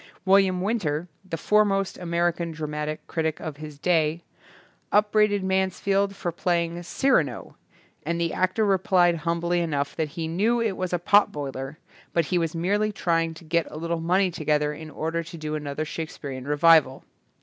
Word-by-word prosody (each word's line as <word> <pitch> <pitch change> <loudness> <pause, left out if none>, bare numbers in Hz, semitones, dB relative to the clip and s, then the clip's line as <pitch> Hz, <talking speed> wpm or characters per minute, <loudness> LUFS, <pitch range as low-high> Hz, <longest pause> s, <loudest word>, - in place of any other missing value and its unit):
William 190 -1 +4
Winter, 175 -7 -1 0.2
the 180 -4 -5
foremost 195 +1 +2
Ameri 170 -1 0
can 170 -1 -4
dramatic 150 -1 -4
critic 160 -1 -2
of 155 -3 -6
his 150 -1 -9
day, 165 0 +1 0.7
up 210 0 +3
braided 210 -2 +3
Mansfield 190 +1 0
for 175 - -3
playing 170 0 -1
"Cy 175 +9 -2
rano", 145 - +1 0.5
and 170 +2 -2
the 170 -1 0
actor 185 +4 +1
replied 185 -3 +3
humbly 170 +2 0
enough 145 -4 -1
that 160 -2 -1
he 165 -1 -2
knew 210 +9 +1
it 225 -2 +1
was 185 -1 -3
a 175 - +1
potboiler 145 -7 +1 0.4
but 170 -2 +2
he 180 +1 +1
was 165 0 -2
merely 205 +5 +1
trying 165 -4 0
to 165 - -13
get 165 +1 0
a - - -8
little 165 +1 -2
money 185 +3 +2
together 150 -2 0
in 155 +1 -9
order 165 +2 -2
to 170 +1 -9
do 155 -1 -4
another 150 0 -3
Shakespearian 140 -4 -6
revival. 150 -2 +4
170 Hz, 170 wpm, -25 LUFS, 155-185 Hz, 0.7 s, William